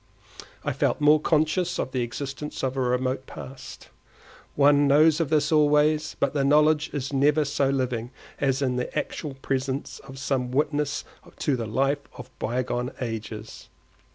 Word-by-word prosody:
I -, -, 0 dB
felt -, -, 0 dB
more 150 Hz, +1 st, +5 dB
conscious 160 Hz, +3 st, +1 dB
of -, -, -2 dB
the 130 Hz, -, -1 dB
existence 140 Hz, +4 st, -5 dB
of 130 Hz, 0 st, -1 dB
a -, -, -2 dB
remote 130 Hz, +1 st, 0 dB
past. 130 Hz, 0 st, -10 dB, 0.7 s
One 145 Hz, 0 st, +5 dB
knows 155 Hz, +3 st, +5 dB
of 165 Hz, -4 st, 0 dB
this 150 Hz, -1 st, +2 dB
always, 150 Hz, 0 st, +3 dB
but 140 Hz, -, +1 dB
the 140 Hz, -2 st, +1 dB
knowledge 150 Hz, +2 st, +4 dB
is 140 Hz, -1 st, -4 dB
never 145 Hz, +2 st, +3 dB
so 140 Hz, -1 st, +1 dB
living 125 Hz, -3 st, -1 dB, 0.3 s
as 135 Hz, 0 st, +1 dB
in 125 Hz, -2 st, 0 dB
the 125 Hz, -, -3 dB
actual 145 Hz, -4 st, -3 dB
presence 135 Hz, +1 st, -2 dB
of 135 Hz, -1 st, -12 dB
some 130 Hz, -2 st, -1 dB
witness 145 Hz, +2 st, 0 dB, 0.3 s
to 145 Hz, -, 0 dB
the 115 Hz, -3 st, -4 dB
life 135 Hz, +6 st, +1 dB, 0.2 s
of 125 Hz, +1 st, -10 dB
bygone 125 Hz, +1 st, -2 dB
ages. 110 Hz, -2 st, -6 dB
140 Hz, 155 wpm, -25 LUFS, 130-150 Hz, 0.7 s, more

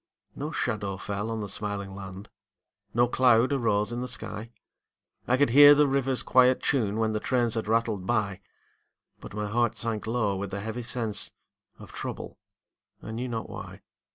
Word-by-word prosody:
No 145 Hz, +2 st, -4 dB
shadow 100 Hz, -9 st, -2 dB
fell 100 Hz, +2 st, -4 dB
on 115 Hz, -1 st, -3 dB
the 105 Hz, -, -4 dB
smiling 100 Hz, 0 st, -4 dB
land, 95 Hz, +1 st, -9 dB, 0.6 s
No 120 Hz, +3 st, +3 dB
cloud 125 Hz, +1 st, +4 dB
arose 110 Hz, -5 st, +1 dB
in 120 Hz, +1 st, -3 dB
the 125 Hz, -, -3 dB
sky; 115 Hz, -3 st, -6 dB, 0.8 s
I 125 Hz, -, +3 dB
could 145 Hz, -3 st, +3 dB
hear 145 Hz, +2 st, +9 dB
the 145 Hz, 0 st, +4 dB
river's 135 Hz, -2 st, 0 dB
quiet 130 Hz, 0 st, +4 dB
tune 110 Hz, -7 st, 0 dB
When 110 Hz, -1 st, +1 dB
the 105 Hz, -, 0 dB
trains 120 Hz, -1 st, +1 dB
had 110 Hz, -2 st, -2 dB
rattled 110 Hz, -4 st, 0 dB
by; 100 Hz, -5 st, 0 dB, 0.8 s
But -, -, -10 dB
my 105 Hz, 0 st, -2 dB
heart 120 Hz, +2 st, +1 dB
sank 110 Hz, -2 st, -2 dB
low 110 Hz, -4 st, 0 dB
with 100 Hz, 0 st, -4 dB
a -, -, -3 dB
heavy 110 Hz, +4 st, -4 dB
sense 110 Hz, -3 st, -1 dB, 0.5 s
Of -, -, -12 dB
trouble, -, -, -6 dB, 0.6 s
I -, -, -7 dB
knew 120 Hz, +3 st, -3 dB
not 115 Hz, -2 st, -4 dB
why. -, -, -9 dB
115 Hz, 175 wpm, -27 LUFS, 105-125 Hz, 0.8 s, hear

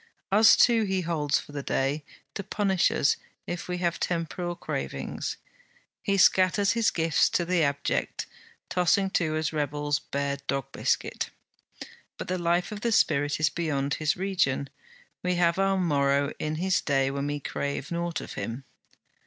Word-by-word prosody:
Us 220 Hz, +3 st, +7 dB
too 235 Hz, -2 st, +5 dB
he 190 Hz, -3 st, 0 dB
holds 155 Hz, -4 st, 0 dB
for -, -, -8 dB
the 145 Hz, -1 st, -4 dB
day, 140 Hz, +2 st, -1 dB, 0.3 s
to 200 Hz, -, -4 dB
punish 195 Hz, -2 st, +1 dB
us 140 Hz, -, +2 dB, 0.3 s
if 175 Hz, -, -5 dB
we 180 Hz, 0 st, -2 dB
have 175 Hz, -1 st, -1 dB
temporal 175 Hz, +1 st, -2 dB
cravings. -, -, -4 dB, 0.6 s
He 200 Hz, -1 st, 0 dB
scatters 190 Hz, +1 st, +4 dB
his 230 Hz, -1 st, +2 dB
gifts 165 Hz, -5 st, +2 dB
to 175 Hz, -, 0 dB
the 180 Hz, 0 st, +1 dB
abject; 140 Hz, -1 st, -1 dB, 0.4 s
tossing 190 Hz, +2 st, +2 dB
to 155 Hz, -4 st, +1 dB
us 155 Hz, 0 st, -1 dB
rebels 145 Hz, -1 st, -1 dB
bare 140 Hz, 0 st, -2 dB
dog 135 Hz, -2 st, -2 dB
biscuit. -, -, -1 dB, 0.9 s
But -, -, -6 dB
the 185 Hz, 0 st, -1 dB
life 175 Hz, +2 st, +1 dB
of 210 Hz, -1 st, -6 dB
the 235 Hz, -, 0 dB
spirit 145 Hz, -8 st, +2 dB
is 155 Hz, 0 st, +2 dB
beyond 145 Hz, -5 st, -1 dB
his 155 Hz, +2 st, 0 dB
region; 175 Hz, -8 st, 0 dB, 0.5 s
we 180 Hz, 0 st, 0 dB
have 175 Hz, +1 st, +2 dB
our 195 Hz, 0 st, +2 dB
morrow 140 Hz, -4 st, +2 dB
in 155 Hz, 0 st, -2 dB
his 185 Hz, +4 st, +1 dB
day 135 Hz, -2 st, +1 dB
when 140 Hz, +1 st, -2 dB
we 145 Hz, 0 st, -2 dB
crave 140 Hz, +1 st, -4 dB
nought 170 Hz, -1 st, -2 dB
of -, -, -8 dB
him. 120 Hz, +4 st, -5 dB
165 Hz, 160 wpm, -27 LUFS, 145-185 Hz, 0.9 s, Us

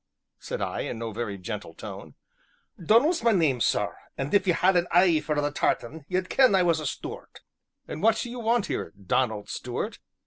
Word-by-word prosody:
said -, -, -4 dB
I, -, -, -3 dB
in -, -, -3 dB
no 115 Hz, 0 st, -4 dB
very 105 Hz, -2 st, -4 dB
gentle 90 Hz, -, -6 dB
tone. -, -, -9 dB, 0.7 s
"Donal's 280 Hz, -, +4 dB
my 230 Hz, -, +4 dB
name, 150 Hz, -, +2 dB
sir, -, -, +1 dB, 0.2 s
an' 135 Hz, +2 st, -3 dB
if 200 Hz, -1 st, +3 dB
ye 180 Hz, -, +4 dB
had 185 Hz, +3 st, +3 dB
an 175 Hz, 0 st, +2 dB
e'e 175 Hz, -4 st, +5 dB
for 150 Hz, -1 st, -1 dB
the 145 Hz, 0 st, 0 dB
tartan, 145 Hz, +1 st, -1 dB
ye'd 185 Hz, 0 st, -1 dB
ken 255 Hz, -4 st, +4 dB
I 185 Hz, -, +4 dB
was 170 Hz, -2 st, +2 dB
a 155 Hz, -, -3 dB
Stuart." -, -, -7 dB, 0.5 s
"And 155 Hz, -, -6 dB
what 225 Hz, +2 st, +4 dB
do 240 Hz, -, -4 dB
you 245 Hz, -, -6 dB
want 230 Hz, -1 st, +1 dB
here, -, -, -4 dB
Donald 105 Hz, +2 st, 0 dB
Stuart?" -, -, -4 dB
170 Hz, 200 wpm, -26 LUFS, 135-205 Hz, 0.7 s, e'e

